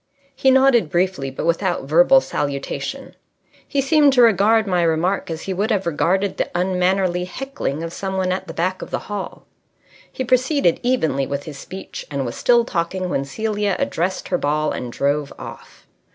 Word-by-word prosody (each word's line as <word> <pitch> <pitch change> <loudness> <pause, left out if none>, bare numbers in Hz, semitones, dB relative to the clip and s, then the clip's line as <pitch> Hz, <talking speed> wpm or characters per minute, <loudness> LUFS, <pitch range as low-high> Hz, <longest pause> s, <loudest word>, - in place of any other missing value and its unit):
He 265 0 +3
nodded 260 - +4
briefly, 175 -5 0
but 135 - -5
without 175 +2 0
verbal 175 - +5
salutation. 140 - -4 0.5
He 280 - 0
seemed 285 0 +4
to 250 -2 +6
regard 220 0 +4
my 180 -3 +1
remark 170 +4 0
as 165 -1 -5
he 195 - -3
would 205 +5 -1
have 205 -4 0
regarded 185 +4 0
the - - -1
unmannerly 180 0 +1
heckling 180 - -4
of 165 0 -5
some 190 -1 -4
one 185 -1 0
at 185 - -3
the - - -7
back 185 +2 -1
of - - -7
the - - -1 0.2
hall. 200 -2 -6 0.7
He 260 - -3
proceeded 255 - +2
evenly 160 - 0
with 140 0 -3
his 145 -3 -9
speech, 190 +6 -8
and 140 -2 -2
was 120 - -5
still 240 -1 +3
talking 185 -1 -2
when 135 -5 -1
Celia 205 +4 -1
addressed 180 +3 -2
her 180 - 0
ball 150 +1 0
and 125 -1 -5
drove 140 +2 -1
off. - - -11
185 Hz, 180 wpm, -21 LUFS, 160-220 Hz, 0.7 s, to